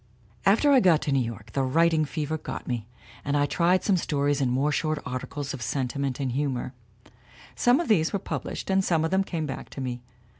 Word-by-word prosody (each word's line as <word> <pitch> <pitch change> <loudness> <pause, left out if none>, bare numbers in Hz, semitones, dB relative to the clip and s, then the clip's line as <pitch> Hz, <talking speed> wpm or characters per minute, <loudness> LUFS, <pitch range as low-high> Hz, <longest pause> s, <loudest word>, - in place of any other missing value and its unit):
"After 230 +9 +5
I 270 - +7
got 175 -8 +4
to 145 - -1
New 135 -2 +2
York 110 -2 -7
the 135 - 0
writing 160 +4 +3
fever 150 +3 -3
got - - -6
me, 120 -3 -3 0.4
and 145 0 0
I 145 - +3
tried 175 +4 +2
some 195 -3 +3
stories 145 -3 0
and 130 -2 +1
more 140 +4 +1
short 155 +1 0
articles 130 +3 -4
of 135 - -7
sentiment 130 +2 -2
and 135 -2 -1
humor. 130 -1 -2 0.8
Some 245 +2 +4
of 345 - -2
these 165 -7 +3
were 200 - 0
pub - - -4
lished - - -4
and 190 0 +3
some 165 -3 +2
of 160 - -2
them 190 +1 +3
came 165 -4 -3
back 135 -3 -6
to - - -9
me. 125 -2 -4
145 Hz, 220 wpm, -26 LUFS, 130-170 Hz, 0.8 s, I